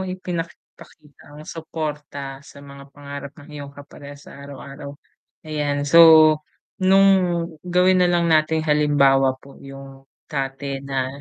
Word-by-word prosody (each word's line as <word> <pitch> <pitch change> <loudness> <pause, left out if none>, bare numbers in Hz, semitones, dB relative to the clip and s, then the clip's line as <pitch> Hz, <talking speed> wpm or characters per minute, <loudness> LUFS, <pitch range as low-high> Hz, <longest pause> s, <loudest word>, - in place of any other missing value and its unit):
ipinapakita 165 -4 -9
ang 150 - -11
suporta 150 -4 -7
sa 140 - -16
mga 140 0 -13
pangarap 140 0 -9
ng 145 +2 -15
iyong 145 -1 -9
kaparehas 145 0 -13
sa 140 - -13
araw-araw? 140 +1 -10 0.5
Ayan. 145 -2 -2
So, 165 +4 +5 0.8
nung 195 +1 +5 0.6
gawin 180 +1 +2
na 180 - +3
lang 175 -1 +1
nating 155 0 +1
halimbawa 140 -3 +2
po 140 +1 -17
yung 135 0 -13 0.2
dati 135 -1 -5
na 135 -1 -3
145 Hz, 125 wpm, -21 LUFS, 140-155 Hz, 0.8 s, So